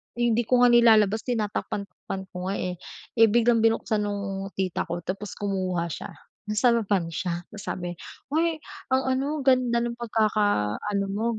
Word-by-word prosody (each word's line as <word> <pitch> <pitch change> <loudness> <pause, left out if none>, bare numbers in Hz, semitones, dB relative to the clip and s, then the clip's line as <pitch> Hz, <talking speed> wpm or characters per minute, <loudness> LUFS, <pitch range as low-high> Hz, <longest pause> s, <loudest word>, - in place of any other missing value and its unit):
Hindi 240 -1 +2
ko 250 -1 +4
nga 245 - +6
nilalabas, 220 -2 +5
tinatakpan-takpan 200 -4 -3
ko 180 0 -5
nga 195 - -1
eh. 180 -2 -3 0.4
Eh 225 - +8
biglang 235 +1 +4
binuksan 225 -1 +2
nung 200 -1 -3
tita 190 -2 -2
ko 175 0 -4
tapos 195 +2 -5
kumuha 185 -4 -2
siya, - - -5 0.4
nasarapan 210 -5 +2
siya 175 +1 -3
tapos 210 - -9
sabi 175 -1 -3 0.4
"Hoy 325 +2 +2 0.4
ang 260 0 +3
ano, 280 +4 -1
ganda 250 -3 +3
ng 240 0 -3
pagkaka 210 - +1
ano 200 -1 -1
mo, 210 +3 -2
210 Hz, 155 wpm, -26 LUFS, 190-235 Hz, 0.4 s, Eh